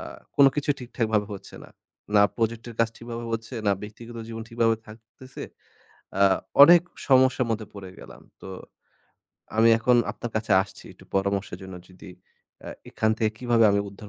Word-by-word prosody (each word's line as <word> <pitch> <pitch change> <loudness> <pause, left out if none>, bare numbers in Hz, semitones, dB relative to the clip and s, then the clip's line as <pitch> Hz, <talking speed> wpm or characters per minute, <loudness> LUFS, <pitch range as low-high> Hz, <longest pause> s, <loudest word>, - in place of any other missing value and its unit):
আ - - -7 0.3
কোনো 140 -1 +7
কিছু 145 0 0
ঠিকঠাকভাবে 110 -4 -1
হচ্ছে 100 - -10
না। - - -15 0.4
না 100 - +7
project 115 0 -2
এর 115 - -9
কাজ 115 - +3
ঠিকভাবে 115 0 -7
হচ্ছে, 115 +3 -5
না 100 - +4
ব্যক্তিগত 115 +3 -10
জীবন 115 0 -6
ঠিকভাবে 115 -1 +1
থাকতেছে। 115 +4 -12 0.8
আ - - +6 0.4
অনেক 170 +4 +9 0.3
সমস্যার 130 -1 +4
মধ্যে 110 -1 -2
পড়ে 95 -2 -9
গেলাম। - - -13 0.2
তো - - -9 1.1
আমি 115 +1 +5
এখন 125 +2 +3 0.2
আপনার 120 - -7
কাছে 110 -1 -1
আসছি 95 - -14
একটু - - -19
পরামর্শের 95 -1 -1
জন্য। 95 0 -9
যদি 90 0 -13 0.6
আ - - -6 0.2
এখান 110 - 0
থেকে 110 -1 +1
কিভাবে 120 -2 +2
আমি 100 - +2
উদ্ধার 100 +1 -12
115 Hz, 165 wpm, -25 LUFS, 105-120 Hz, 1.1 s, অনেক